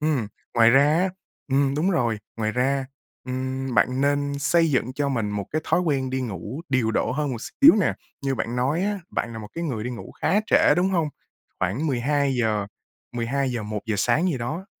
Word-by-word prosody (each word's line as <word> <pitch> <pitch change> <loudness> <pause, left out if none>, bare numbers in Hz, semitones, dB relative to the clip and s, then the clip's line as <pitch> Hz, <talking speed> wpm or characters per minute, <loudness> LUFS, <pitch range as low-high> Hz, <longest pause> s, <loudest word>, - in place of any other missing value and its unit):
Ừm, 150 -8 0 0.3
ngoài 115 0 +6
ra 135 +3 +6
á 190 +1 +2 0.4
ừm, 135 0 +2
đúng 165 +6 +1
rồi. 120 - +1 0.2
Ngoài 110 -1 -1
ra, 130 +2 0 0.4
ừm, 130 0 -3
bạn 130 +1 +2
nên 145 0 +1
xây 165 +2 +3
dựng 130 -1 0
cho 140 +1 -1
mình 115 -6 -1
một 100 -1 -3
cái 155 +1 -1
thói 180 - +2
quen 135 -6 0
đi 130 0 -1
ngủ 110 - -5
điều 130 -4 +1
độ 115 - 0
hơn 145 0 -1
một 120 - -3
xíu 285 - +6
nè. 170 - +1 0.3
Như 135 -1 0
bạn 120 0 -3
nói 140 +8 +1
á, 205 0 -1
bạn 115 - -2
là 115 - -6
một 105 -1 -8
cái 170 - -3
người 120 -8 -3
đi 125 - -3
ngủ 120 - -8
khá 205 - +3
trễ, - - +5
đúng 180 +2 +2
hông? 165 -5 +1 0.5
Khoảng 100 - -1
12:00, 125 -6 +1 0.5
12:00, 120 0 -1
1:00 105 +1 -3
sáng 125 - +2
gì 150 -7 -1
đó, 155 +11 -4
130 Hz, 205 wpm, -24 LUFS, 115-150 Hz, 0.5 s, ngoài